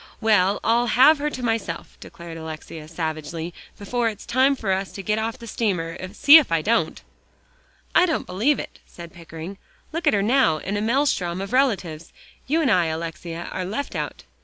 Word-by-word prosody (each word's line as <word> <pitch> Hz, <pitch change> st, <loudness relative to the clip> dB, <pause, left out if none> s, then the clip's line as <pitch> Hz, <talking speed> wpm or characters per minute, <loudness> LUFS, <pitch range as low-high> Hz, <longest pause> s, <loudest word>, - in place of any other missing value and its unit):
"Well, 205 Hz, -3 st, +3 dB
I'll 235 Hz, +2 st, +2 dB
have 275 Hz, +6 st, +6 dB
her 300 Hz, +1 st, 0 dB
to 255 Hz, -4 st, -7 dB
myself," 225 Hz, -8 st, -3 dB
declared 170 Hz, -1 st, -10 dB
Alexia 160 Hz, -1 st, -8 dB
savagely, 160 Hz, +1 st, -4 dB, 0.2 s
"before 230 Hz, +3 st, -1 dB
it's 210 Hz, -2 st, -9 dB
time 265 Hz, +3 st, +3 dB
for 215 Hz, -7 st, -2 dB
us 190 Hz, 0 st, -1 dB
to 195 Hz, -, -7 dB
get 210 Hz, +3 st, 0 dB
off 225 Hz, +1 st, -3 dB
the 235 Hz, -, -11 dB
steamer, 185 Hz, -8 st, -2 dB, 0.2 s
see 285 Hz, +7 st, +9 dB
if 295 Hz, -, +2 dB
I 165 Hz, -2 st, +1 dB
don't." 230 Hz, +2 st, 0 dB, 0.9 s
"I 360 Hz, -, +5 dB
don't 320 Hz, -, -1 dB
believe 225 Hz, +11 st, +1 dB
it," -, -, -8 dB
said 170 Hz, -1 st, -11 dB
Pickering. 170 Hz, +2 st, -9 dB, 0.3 s
"Look 330 Hz, +2 st, -2 dB
at -, -, +5 dB
her 200 Hz, -, +1 dB
now 235 Hz, -, +3 dB
in 195 Hz, +6 st, -4 dB
a 205 Hz, -, -1 dB
maelstrom 220 Hz, -8 st, +1 dB
of 195 Hz, +4 st, -5 dB
relatives. 185 Hz, -, 0 dB, 0.4 s
You 320 Hz, +4 st, +2 dB
and 260 Hz, -, +3 dB
I, 180 Hz, -4 st, +3 dB
Alexia, 165 Hz, +1 st, -5 dB
are 185 Hz, -, -3 dB
left 215 Hz, +10 st, -4 dB
out." -, -, -4 dB
200 Hz, 185 wpm, -23 LUFS, 170-245 Hz, 0.9 s, see